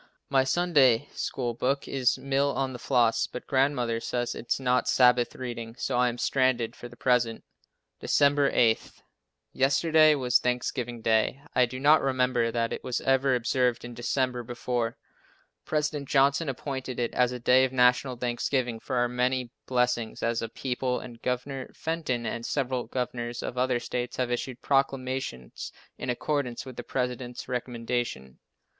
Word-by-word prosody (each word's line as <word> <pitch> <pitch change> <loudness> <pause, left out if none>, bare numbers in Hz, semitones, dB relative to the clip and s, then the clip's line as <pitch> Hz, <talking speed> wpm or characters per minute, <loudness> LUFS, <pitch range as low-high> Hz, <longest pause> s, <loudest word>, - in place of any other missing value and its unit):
My 135 -1 +4
Sunday 145 -5 +3
School 120 -3 -3
book 135 +4 -1
is 130 -2 +1
"Mill 140 +1 +1
on 135 -1 -1
the 125 - -7
Floss," 120 -2 +2
but 125 - -8
Grandmother 130 -4 +1
says 120 +1 -2
it 120 - -9
is - - +2
not 125 -1 +1
Sabbath 125 -1 +4
reading, 120 -2 -6
so - - -2
I 125 0 +3
am 120 - -5
stranded 125 -3 +1
for 120 - -9
the 120 - -14
present. 120 -2 +1 0.6
December 145 0 +3
8. 115 -2 +2 0.6
Yesterday 155 +3 +4
was 125 -3 +3
Thanksgiving 125 -1 -2
day. 110 +5 +1
I 125 -1 +4
do 130 +2 -7
not 150 +3 +5
remember 125 -3 +1
that 115 0 -1
it - - -6
was 125 -2 -2
ever 135 0 +3
observed 125 0 0
in 120 - -8
December 125 +1 -1
before. 120 -1 -3 0.7
President 150 -2 -1
Johnson 140 +2 +3
appointed 130 -1 -4
it 120 -1 -1
as 125 -1 +2
a 125 - -4
day 125 +2 +4
of 130 - +1
national 125 0 +3
thanksgiving 120 0 -1
for 130 - -4
our 120 0 +2
many 125 0 -1 0.2
blessings 125 -2 0
as 115 0 0
a 115 - -4
people, 125 +1 -2
and 120 -2 -11
Governor 130 +1 -3
Fenton 155 -7 -2
and 115 +1 -3
several 130 -1 -1
governors 120 -1 -3
of - - -4
other 125 -1 +1
states 120 +1 -4
have 125 -1 -1
issued 125 +1 -4
proclamations 130 - -1 0.3
in 125 - -4
accordance 125 -1 -2
with 130 -2 -9
the 120 - -6
President's 125 0 -3
recommendation. 120 - -3
125 Hz, 160 wpm, -27 LUFS, 120-135 Hz, 0.7 s, not